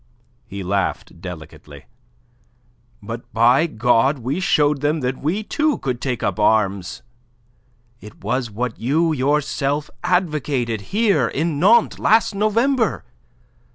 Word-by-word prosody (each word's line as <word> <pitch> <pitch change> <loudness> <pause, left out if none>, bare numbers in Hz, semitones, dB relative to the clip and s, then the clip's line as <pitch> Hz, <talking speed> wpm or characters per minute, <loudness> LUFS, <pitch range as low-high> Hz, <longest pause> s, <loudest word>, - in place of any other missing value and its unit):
He 100 -2 -6
laughed 95 -2 -3
delicately. 80 -5 -10 1.2
"But, 115 +3 -8
by 120 +8 +4
God, 125 +2 +2
we 130 +7 -3
showed 150 -7 +2
them 150 +1 0
that 125 0 -2
we, 180 +9 -1
too, 305 +6 0
could 125 -3 -4
take 125 -4 -3
up 100 - -1
arms. 100 -4 +1 1.0
It 105 -2 -14
was 125 -2 -1
what 115 +2 -4
you 155 +7 +1
yourself 145 +1 -1
advocated 150 - 0
here 200 - +2
in 155 +3 -2
Nantes, 220 +6 +4
last 220 0 +3
November. 225 +5 +1
135 Hz, 120 wpm, -20 LUFS, 115-170 Hz, 1.2 s, by